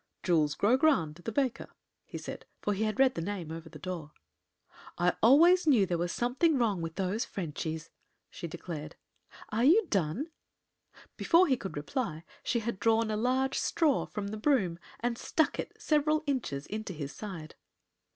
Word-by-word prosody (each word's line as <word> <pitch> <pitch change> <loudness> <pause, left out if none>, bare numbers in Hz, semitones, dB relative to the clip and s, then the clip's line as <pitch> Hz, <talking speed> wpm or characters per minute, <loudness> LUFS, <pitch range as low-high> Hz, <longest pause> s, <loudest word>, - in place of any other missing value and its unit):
"Jules 155 -4 +2
Grogrande, 200 - +2
the 225 - -2
baker," 260 0 -1 0.4
he - - -7
said, - - -7
for 205 - 0
he 210 +3 0
had 215 -1 -2
read 265 -1 +5
the 165 - -4
name 180 -3 -4
over 165 0 -7
the 160 - -11
door. 155 -1 -6 0.8
"I 175 0 +3
always 325 +9 +6
knew 240 -10 +5
there 180 -2 -1
was 175 0 -1
something 265 +6 +2
wrong 215 -8 +1
with 165 0 -5
those 195 +4 -1
Frenchies," 160 - -5 0.4
she 170 - -6
declared. 155 -1 -7 0.5
"Are 220 +3 0
you 370 - +6
done?" 200 - 0 0.9
Before 345 +2 +5
he 275 -7 +3
could 195 -9 -6
reply 160 - -3 0.2
she 235 - 0
had 225 -3 -3
drawn 225 0 +2
a - - 0
large 255 +4 +1
straw 315 -5 +1
from 200 -2 -4
the 215 - -5
broom 210 - +1 0.2
and 235 0 -1
stuck 315 - 0
it - - -5
several 305 0 +2
inches 225 - -2
into 215 -2 -5
his 145 -3 -6
side. 175 -7 -7
210 Hz, 170 wpm, -30 LUFS, 170-260 Hz, 0.9 s, always